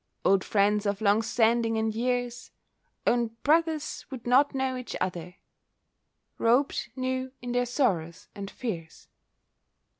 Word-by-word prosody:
Old 190 0 +4
friends 205 0 +2
of 200 0 -1
long 210 0 +3
standing 225 0 +2
and 220 0 0
years— 245 +1 -2 0.6
Own 235 -2 +1
brothers 315 0 +1
would 260 -4 -8
not 270 +4 +4
know 265 -1 0
each 250 -1 -6
other, 180 -1 -3 1.0
Robed 245 +5 +2
new 260 0 -2
in 245 -1 -5
their 245 0 +1
sorrows 185 - -1
and 200 -2 -6
fears. 175 -11 -6
235 Hz, 125 wpm, -28 LUFS, 205-255 Hz, 1.0 s, Old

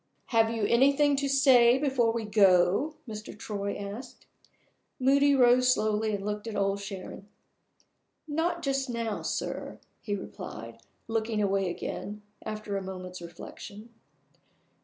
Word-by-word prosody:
"Have 225 -1 +4
you 225 -2 -1
anything 280 +5 +4
to 280 0 0
say 260 -3 +6
before 265 -5 +2
we 230 -1 -3
go?" 200 - +4
Mr. 215 -1 -8
Troy 200 -2 -4
asked. 205 +5 -8 0.7
Moody 280 +2 +4
rose 250 0 +5
slowly 215 -2 +1
and 195 0 -6
looked 210 +1 -3
at 220 - -5
Old 200 0 0
Sharon. 195 0 -8 1.0
"Not 335 +3 -1
just 275 -2 -1
now, 230 -3 -2
sir," - - -4 0.2
he 205 -3 -2
replied, 195 - -8 0.3
looking 225 -1 -1
away 195 -2 +1
again, 205 +4 -5 0.2
after 215 -1 -4
a 195 - -1
moment's 185 -1 -7
reflection. 200 +5 -10
220 Hz, 130 wpm, -28 LUFS, 200-260 Hz, 1.0 s, say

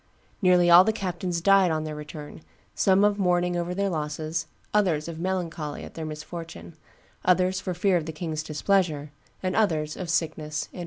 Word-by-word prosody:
Nearly 180 -2 +5
all 175 +2 +10
the 220 - +2
captains 180 -4 -3
died 195 0 +5
on 155 -1 -1
their 155 -1 -5
return, 150 0 -9 0.3
some 195 +1 +3
of 205 0 +2
mourning 180 -1 +2
over 175 +1 -2
their 200 +1 0
losses, 155 0 -3 0.3
others 175 -8 +2
of 165 -1 -6
melancholy 170 -5 -3
at - - -10
their 160 -1 -5
misfortune, 155 - -8 0.5
others 185 +1 +3
for 185 - -3
fear 185 +1 +2
of 160 -2 -4
the - - -3
king's 155 -1 -4
displeasure, 155 -2 0 0.3
and 185 0 -1
others 155 -8 +1
of 180 -3 -6
sickness 155 -2 -1
and - - -14
weariness." - - -9
170 Hz, 180 wpm, -26 LUFS, 155-185 Hz, 0.5 s, all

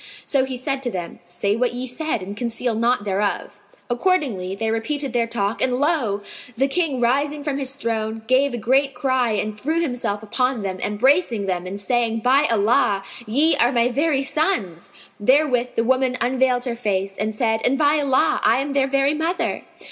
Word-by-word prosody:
So 270 -2 +1
he 260 -1 -5
said 270 +2 -2
to 250 - -2
them, 180 -6 -6
"Say 180 +4 -2
what 245 +1 0
ye 250 +1 -3
said 260 - -3
and 200 +2 -7
conceal 235 +1 -2
naught 235 0 +1
thereof." 200 0 -2 0.3
Accordingly, 240 - 0
they 220 +2 -2
repeated 270 +4 -2
their 235 -1 +1
talk, 225 -1 -2
and 250 -1 +1
lo! 265 -10 0 0.3
the 270 +3 +2
King 285 -3 0
rising 285 +5 0
from 285 -2 -2
his 270 0 -2
throne, 225 -3 -3
gave 260 +4 +3
a 240 - -4
great 270 +4 +1
cry 255 -3 +1
and 210 0 -2
threw 320 +4 0
himself 245 -9 -2
upon 250 +1 -1
them, 190 -1 -4
embracing 235 - +1
them 180 -1 -2
and 195 +2 -5
saying, 230 +1 0
"By 270 +5 +3
Allah, 205 -2 +2 0.2
ye 290 +9 +4
are 240 +2 +3
my 240 -1 +2
very 280 +2 +1
sons!" 270 - -1 0.3
Therewith 255 +1 +2
the 230 - +1
woman 255 +1 +1
unveiled 250 +1 +1
her 240 -2 -2
face 195 -4 -2
and 215 +2 -2
said, 220 -1 0
"And 270 +2 +2
by 295 +1 +3
Allah, 275 -2 +2
I 235 - +4
am 280 +1 -2
their 275 -1 +2
very 275 +1 +2
mother." 325 +4 -1
245 Hz, 185 wpm, -21 LUFS, 215-275 Hz, 0.3 s, ye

